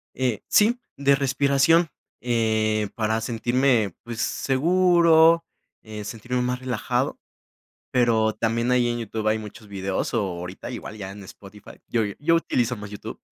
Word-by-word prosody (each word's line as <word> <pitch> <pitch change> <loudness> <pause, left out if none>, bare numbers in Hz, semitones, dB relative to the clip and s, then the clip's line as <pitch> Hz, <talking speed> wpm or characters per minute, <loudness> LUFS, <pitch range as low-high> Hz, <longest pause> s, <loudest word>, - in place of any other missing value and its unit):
Eh, 125 -6 -1
sí, 230 +4 +4 0.2
de 140 0 +3
respiración, 140 +4 +3 0.3
eh, 110 -3 +1
para 110 -1 0
sentirme, 120 -3 +1
pues 120 -1 -5
seguro, 165 +2 +4 0.4
eh, 110 -1 -7
sentirme 120 +4 -3
más 125 0 -1
relajado, 130 -1 -2 0.7
pero 115 -3 +2
también 115 +2 0
ahí 125 -1 +3
en 120 0 -2
YouTube 110 -1 -4
hay 110 +1 +2
muchos 105 0 -11
videos, 95 -1 -3
o 115 - +2 0.2
ahorita, 90 +7 -7
igual 115 -3 -7
ya 95 -2 -6
en 100 0 -10
Spotify, 100 +2 -13
yo 115 - 0 0.2
yo 165 +3 +3
utilizo 125 -7 0
más 105 0 -8
YouTube, 105 - -8
120 Hz, 145 wpm, -24 LUFS, 110-135 Hz, 0.7 s, sí